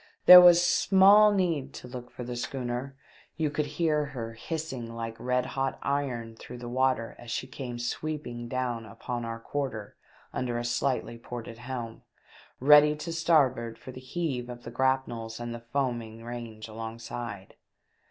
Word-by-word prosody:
There 180 0 +13
was 175 0 +7
small 200 +4 +6
need 165 -9 0
to - - -9
look 125 -1 -8
for 125 - -8
the 120 0 -5
schooner; 125 +1 -4 0.4
you 155 -3 0
could 145 0 -1
hear 155 -3 +2
her 120 -5 -6
hissing 130 -3 -5
like 115 -1 -5
red 125 0 0
hot 135 0 -2
iron 125 -5 -2
through 125 +2 -10
the 120 0 -8
water 130 -2 0
as 120 - -11
she 125 - -2
came 130 -2 -6
sweeping 120 -1 -4
down 125 -2 -2
upon 120 +3 -5
our 115 0 -5
quarter 115 -5 -4 0.4
under 120 -2 -2
a 120 - -3
slightly 120 -1 -1
ported 115 -1 -8
helm, 120 -2 -6 0.6
ready 150 +2 +7
to 165 +2 -5
starboard 135 -9 +2
for 130 - -10
the 130 - -10
heave 130 -3 -3
of 120 0 -8
the 115 - -8
grapnels 120 -3 -1
and 120 0 -5
the 115 0 -9
foaming 120 -5 -2
range 115 -2 -7
alongside. 115 -2 -7
125 Hz, 160 wpm, -28 LUFS, 115-145 Hz, 0.6 s, There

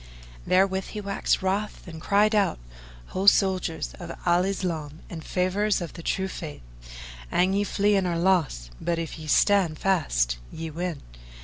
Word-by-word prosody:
Therewith 190 0 +3
he 210 - -6
waxed 200 -1 0
wroth 200 +2 -2
and 160 -2 -8
cried 210 +4 +3
out, 205 -3 +2 0.5
"Ho, 195 +2 -2
soldiers 185 - +3
of - - -6
Al 175 +1 +3
Islam 165 -6 -3
and 160 -2 -6
favourers 195 +5 +1
of 170 -3 -6
the - - -9
True 190 +3 -1
Faith, 155 - -7 0.7
an 185 +2 +2
you 200 +1 +1
flee 205 0 +2
you 190 -2 +2
are 170 -1 -1
lost, 165 - +1
but 170 -1 0
if 165 -1 -5
ye 155 - -8
stand 185 -2 +3
fast, - - +1
ye 160 0 -6
win! 170 -1 -4
180 Hz, 165 wpm, -26 LUFS, 160-195 Hz, 0.7 s, Therewith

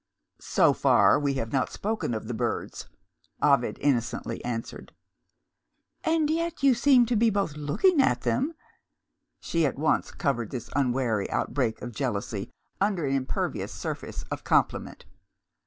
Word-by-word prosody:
"So - - +3
far, - - +4
we 140 -2 0
have 115 -4 -4
not 135 - +1
spoken 215 - -2
of 110 0 -5
the 120 - -3
birds," 110 - -3 0.5
Ovid - - +2
innocently 120 -4 -1
answered. 115 -2 -6 1.1
"And 320 -1 +2
yet 335 0 -2
you 275 -2 +6
seemed 245 0 +4
to 245 - +2
be 225 +1 +4
both 200 -7 -1
looking 275 - +2
at - - +2
them!" 290 +6 0 0.9
She 165 -1 0
at 140 -4 0
once 155 +3 +1
covered 120 -6 -2
this 120 -3 -6
unwary 125 -6 0
outbreak 120 -6 -1
of 120 -1 -6
jealousy 105 -4 -3 0.3
under 195 -6 +1
an 135 - 0
impervious 135 -1 -2
surface - - -5
of - - -4
compliment. - - 0
145 Hz, 140 wpm, -27 LUFS, -, 1.1 s, you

